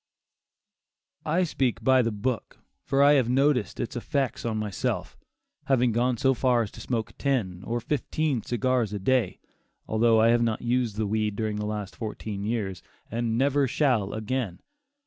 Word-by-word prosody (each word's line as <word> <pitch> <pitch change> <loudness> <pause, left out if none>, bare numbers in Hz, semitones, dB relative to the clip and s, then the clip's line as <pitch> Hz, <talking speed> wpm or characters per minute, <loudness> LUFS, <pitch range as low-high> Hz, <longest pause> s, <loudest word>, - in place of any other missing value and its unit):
I 170 +4 +2
speak 125 -8 -1
"by 130 +1 +5
the 115 -1 0
book," 110 +3 -3 0.3
for 140 0 +2
I 145 - +7
have 130 -5 +3
noticed 125 -6 +2
its 120 - -3
effects 135 +1 -2
on 110 -2 -1
myself, 105 -3 -2 0.5
having 125 -3 +3
gone 120 +2 +1
so 135 +3 +3
far 125 -2 +2
as 105 - -7
to - - -11
smoke 115 -3 -3
ten 100 -10 -1
or 120 +1 -1
fifteen 145 +1 -1
cigars 120 -1 0
a 105 - -2
day, 120 0 +1 0.5
although 110 +1 +3
I 115 +1 +5
have 120 0 +4
not 115 -2 0
used 120 -3 0
the 110 0 -1
weed 105 0 -1
during 110 -1 -2
the 105 0 -3
last 105 -2 -4
fourteen 105 -2 -5
years, 105 -5 -2 0.3
and 115 0 -1
never 140 +1 +2
shall 120 -8 +1
again. 110 -3 -3
120 Hz, 165 wpm, -26 LUFS, 110-130 Hz, 0.5 s, I